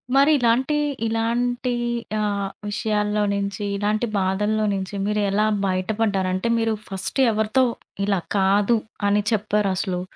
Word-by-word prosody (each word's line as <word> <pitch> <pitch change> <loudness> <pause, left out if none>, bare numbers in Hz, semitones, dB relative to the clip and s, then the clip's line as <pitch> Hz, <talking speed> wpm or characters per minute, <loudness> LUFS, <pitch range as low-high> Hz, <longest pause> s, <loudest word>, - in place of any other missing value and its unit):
మరిలాంటి 275 -1 +3 0.3
ఇలాంటి 240 +2 0 0.5
ఆహ్, 200 -2 -1 0.2
విషయాల్లో 210 0 0
నుంచి, 200 0 -3
ఇలాంటి 210 +3 0
బాధల్లో 210 +3 0
నుంచి 190 +1 -4
మీరు 210 0 0
ఎలా 210 +2 +2 0.2
బయటపడ్డారు? 190 0 0
అంటే 185 +5 -1
మీరు 225 -1 +1 0.2
ఫస్ట్ 195 +7 -1
ఎవరితో 220 +4 +2 0.4
ఇలా 200 -2 +1 0.2
కాదు 200 +4 +3 0.3
అని 205 +1 +3
చెప్పారసలు? 200 -3 0
210 Hz, 110 wpm, -23 LUFS, 195-225 Hz, 0.5 s, మరిలాంటి